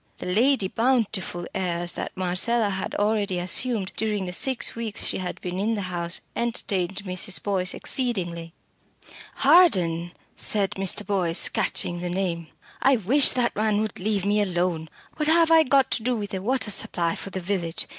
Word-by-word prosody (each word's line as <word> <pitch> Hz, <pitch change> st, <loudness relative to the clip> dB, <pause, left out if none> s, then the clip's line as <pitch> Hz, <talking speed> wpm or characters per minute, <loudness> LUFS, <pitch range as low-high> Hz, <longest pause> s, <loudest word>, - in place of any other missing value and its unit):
The -, -, -8 dB
Lady 220 Hz, +3 st, +2 dB
Bountiful 220 Hz, -7 st, -1 dB
airs 175 Hz, -2 st, -2 dB
that -, -, -7 dB
Marcella 200 Hz, +4 st, 0 dB
had 190 Hz, -1 st, -4 dB
already 205 Hz, -2 st, 0 dB
assumed 190 Hz, +3 st, -1 dB
during 210 Hz, -3 st, -2 dB
the 180 Hz, -, -5 dB
six 260 Hz, +6 st, +2 dB
weeks 230 Hz, -2 st, -3 dB
she -, -, -2 dB
had 180 Hz, -1 st, -5 dB
been 180 Hz, 0 st, -4 dB
in 220 Hz, +3 st, 0 dB
the 205 Hz, -, -4 dB
house 170 Hz, 0 st, -1 dB
entertained 195 Hz, -5 st, -2 dB
Mrs. 185 Hz, +1 st, 0 dB
Boyce 185 Hz, -3 st, 0 dB
exceedingly. 175 Hz, -10 st, -2 dB, 0.8 s
"Harden!" 185 Hz, -, +3 dB, 0.2 s
said 200 Hz, -2 st, +2 dB
Mr. 195 Hz, +2 st, 0 dB
Boyce, 180 Hz, -4 st, +3 dB
catching 175 Hz, 0 st, 0 dB
the 175 Hz, 0 st, -4 dB
name. 175 Hz, -3 st, -3 dB, 0.3 s
"I 270 Hz, 0 st, +4 dB
wish 250 Hz, +6 st, +5 dB
that 245 Hz, -2 st, 0 dB
man 215 Hz, 0 st, +1 dB
would 215 Hz, -2 st, -4 dB
leave 200 Hz, 0 st, -1 dB
me 205 Hz, +1 st, +2 dB
alone. 175 Hz, -4 st, -2 dB, 0.3 s
What 300 Hz, -1 st, 0 dB
have 330 Hz, +1 st, +4 dB
I 325 Hz, 0 st, +7 dB
got 270 Hz, -2 st, +2 dB
to -, -, 0 dB
do 250 Hz, +2 st, -1 dB
with 205 Hz, -3 st, -6 dB
a 190 Hz, -, -3 dB
water 245 Hz, 0 st, -1 dB
supply 170 Hz, -3 st, 0 dB
for -, -, -7 dB
the 190 Hz, -, -5 dB
village? 175 Hz, -3 st, -2 dB
195 Hz, 170 wpm, -24 LUFS, 180-230 Hz, 0.8 s, I